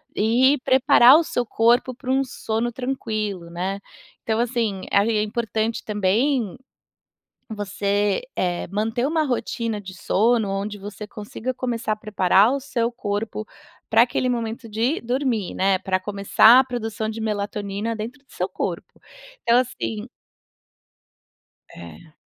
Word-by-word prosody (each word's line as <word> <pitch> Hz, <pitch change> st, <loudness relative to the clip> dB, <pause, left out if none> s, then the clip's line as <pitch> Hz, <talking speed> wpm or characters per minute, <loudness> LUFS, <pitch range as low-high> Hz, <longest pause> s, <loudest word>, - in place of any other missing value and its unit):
e 250 Hz, +6 st, +3 dB
preparar 265 Hz, 0 st, +7 dB
o 335 Hz, -, +2 dB
seu 245 Hz, -6 st, -2 dB
corpo 240 Hz, +3 st, +2 dB
para 255 Hz, +1 st, -9 dB
um 270 Hz, +1 st, +2 dB
sono 235 Hz, -2 st, -3 dB
tranquilo, 215 Hz, -8 st, -4 dB
né. 185 Hz, +3 st, -3 dB, 0.4 s
Então 220 Hz, 0 st, 0 dB
assim 230 Hz, -5 st, -1 dB
ai, 200 Hz, +3 st, +3 dB
é 215 Hz, -1 st, +1 dB
importante 220 Hz, +1 st, -2 dB
também 215 Hz, +3 st, 0 dB, 1.0 s
você, 205 Hz, 0 st, 0 dB
eh, 175 Hz, -1 st, -1 dB
manter 220 Hz, +6 st, -1 dB
uma 315 Hz, 0 st, +1 dB
rotina 230 Hz, -4 st, -2 dB
de 190 Hz, -1 st, -10 dB
sono, 220 Hz, +4 st, +1 dB
onde 200 Hz, +1 st, -3 dB
você 205 Hz, +1 st, -8 dB
consiga 215 Hz, +4 st, -5 dB
começar 240 Hz, -3 st, -2 dB
a 215 Hz, -, -1 dB
preparar 205 Hz, +1 st, +3 dB
o 280 Hz, -, -1 dB
seu 240 Hz, -3 st, -1 dB
corpo 215 Hz, -1 st, -4 dB, 0.5 s
pra 225 Hz, +1 st, +6 dB
aquele 250 Hz, +1 st, 0 dB
momento 230 Hz, 0 st, -3 dB
de 230 Hz, +9 st, 0 dB
dormir, 245 Hz, -5 st, -1 dB
né, 190 Hz, 0 st, +2 dB
pra 185 Hz, -1 st, 0 dB
começar 205 Hz, +5 st, +5 dB
a -, -, +1 dB
produção 225 Hz, -3 st, -4 dB
de 220 Hz, +1 st, -5 dB
melatonina 205 Hz, 0 st, -3 dB
dentro 230 Hz, +6 st, -6 dB
do -, -, -24 dB
seu -, -, -2 dB
corpo. -, -, -5 dB, 0.4 s
Então, 235 Hz, +1 st, +4 dB
assim 115 Hz, -, -3 dB, 1.7 s
É. 85 Hz, -, -12 dB
220 Hz, 135 wpm, -23 LUFS, 205-245 Hz, 1.7 s, preparar